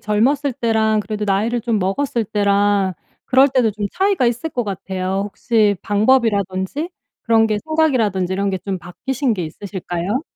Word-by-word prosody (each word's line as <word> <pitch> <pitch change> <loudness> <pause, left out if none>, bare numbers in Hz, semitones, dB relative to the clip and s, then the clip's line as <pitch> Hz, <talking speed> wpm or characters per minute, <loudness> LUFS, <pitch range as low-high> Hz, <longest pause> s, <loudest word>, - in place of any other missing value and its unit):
젊었을 260 +7 +1
때랑 220 -2 +1
그래도 210 0 -4
나이를 215 +5 0
좀 225 -2 0
먹었을 225 +5 -1
때랑 200 -2 +1 0.3
그럴 270 +1 +5
때도 250 -5 +2
좀 205 0 -3
차이가 385 -8 +1
있을 240 +7 -1
것 245 -4 -1
같아요. 190 -1 -3
혹시 210 -1 +1
방법이라든지 205 - +1 0.3
그런 225 -1 +4
게 210 -1 0
생각이라든지 235 - +1
이런 200 +1 0
게 190 - -2
좀 190 0 -4
바뀌신 250 +8 -2
게 180 - -3
있으실까요? 185 - -4
210 Hz, 355 characters per minute, -19 LUFS, 195-245 Hz, 0.3 s, 그럴